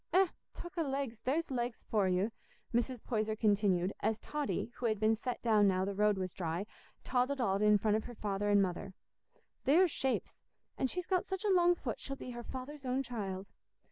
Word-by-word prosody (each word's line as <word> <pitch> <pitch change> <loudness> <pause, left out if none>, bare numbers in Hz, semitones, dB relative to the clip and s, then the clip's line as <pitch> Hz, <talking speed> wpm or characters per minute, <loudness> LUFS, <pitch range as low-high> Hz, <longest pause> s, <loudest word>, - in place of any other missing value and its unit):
Eh! 375 0 +5 0.3
Talk 345 0 -7
o' - - +3
legs, 270 -6 -2
there's 295 +4 0
legs 240 -2 -2
for 205 -3 +2
you," 185 +4 +1 0.4
Mrs. 240 0 0
Poyser 215 -2 0
continued, 205 -4 +2
as 220 0 +1
Totty, 290 -2 -3
who 245 - 0
had 215 -2 0
been 220 +1 +4
set 245 +3 -4
down 215 -3 +5
now 185 -1 +2
the 200 - -2
road 210 0 +3
was 185 -2 -3
dry, 170 +2 -2 0.4
toddled 260 +2 +1
on 200 -5 +1
in 210 0 +6
front 210 +1 +2
of 220 - -4
her 240 - -8
father 205 -1 -1
and 205 -1 +5
mother. 190 +1 -4 0.7
"There's 330 +6 +5
shapes! 265 -2 -1 0.4
An' 265 - +1
she's 360 +6 -3
got 370 -2 +1
such 385 +2 -3
a 410 - +3
long 350 -1 +5
foot, 245 -9 -4
she'll 275 - -5
be 255 - -7
her 240 0 -6
father's 265 +4 -7
own 260 +1 0
child." 200 -6 -4
230 Hz, 205 wpm, -34 LUFS, 205-270 Hz, 0.7 s, in